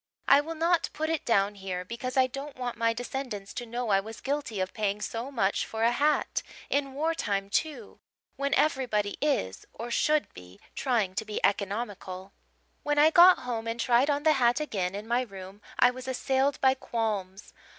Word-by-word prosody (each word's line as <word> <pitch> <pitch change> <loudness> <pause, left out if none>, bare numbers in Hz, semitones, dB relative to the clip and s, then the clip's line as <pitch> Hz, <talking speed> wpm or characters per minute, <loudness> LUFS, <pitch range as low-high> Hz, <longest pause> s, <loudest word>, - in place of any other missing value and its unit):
I 280 +1 +7
will 325 +2 -6
not 335 +1 +2
put 315 +1 -2
it 325 - -2
down 205 -3 +3
here 190 -2 -5
because 250 +5 -5
I 260 - +6
don't 275 +3 -7
want 250 -2 -4
my 230 0 +2
descendants 240 -4 -5
to 240 -1 -5
know 240 0 -3
I 195 -1 +4
was 220 +3 -8
guilty 275 -7 -3
of 185 0 -2
paying 210 -1 -1
so 230 +4 -4
much 215 -8 0
for 225 0 -4
a 230 - +4
hat, 295 +5 +1 0.3
in 275 -1 0
war 320 +3 0
time, 200 -8 -2
too, 310 +6 -2 0.4
when 280 0 0
everybody 240 -9 +1
is 95 - 0
or 235 +1 -6
should 305 +4 +1
be 90 +2 -13
trying 225 -8 0
to 210 - -2
be 215 -1 -4
economical. 200 -2 -3 0.5
"When 295 0 -1
I 305 +2 +6
got 355 +2 +7
home 230 -2 -3
and 230 +1 -3
tried 245 +4 +3
on 290 0 0
the 310 0 +5
hat 245 -1 +3
again 195 -11 -2
in 210 +2 -6
my 240 +2 +2
room 195 -3 -9 0.2
I 250 - +5
was 255 +1 -9
assailed 265 +2 0
by 265 -1 +5
qualms. 210 -6 -4
240 Hz, 190 wpm, -28 LUFS, 205-275 Hz, 0.5 s, I